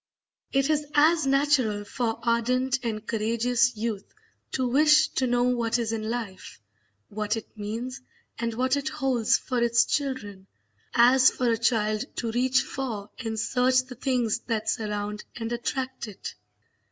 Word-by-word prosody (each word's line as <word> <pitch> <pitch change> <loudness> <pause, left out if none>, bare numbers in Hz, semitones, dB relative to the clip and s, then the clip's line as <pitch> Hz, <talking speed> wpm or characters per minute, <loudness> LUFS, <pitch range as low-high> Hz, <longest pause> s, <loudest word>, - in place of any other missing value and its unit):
It 275 +2 +2
is 300 -1 0
as 310 0 +4
natural 270 -7 +2
for 225 +1 -2
ardent 250 +3 +1
and 220 -3 -4
courageous 235 +2 +1
youth 215 -2 -4 0.4
to 260 -1 0
wish 300 +4 +5
to 260 - 0
know 245 0 +2
what 240 -2 +1
is 230 -2 -2
in 220 -1 -3
life, 225 -6 -6 0.5
what 210 +2 -2
it 220 - -9
means, 230 +5 -5 0.4
and 235 0 -1
what 260 +3 +1
it 285 -1 -2
holds 260 -6 +1
for 250 -2 -3
its 235 0 +4
children, 215 -10 -3 0.5
as 250 +2 +6
for 245 -2 0
a - - +3
child 215 -2 +1
to 230 -2 -2
reach 255 +2 +2
for 220 -7 -5
and 220 -1 -3
search 255 +2 +2
the 255 - -9
things 245 -3 0
that 220 -2 0
surround 210 -1 -3
and 225 0 -4
attract 260 +1 -3
it. 205 - -8
235 Hz, 155 wpm, -26 LUFS, 220-260 Hz, 0.5 s, as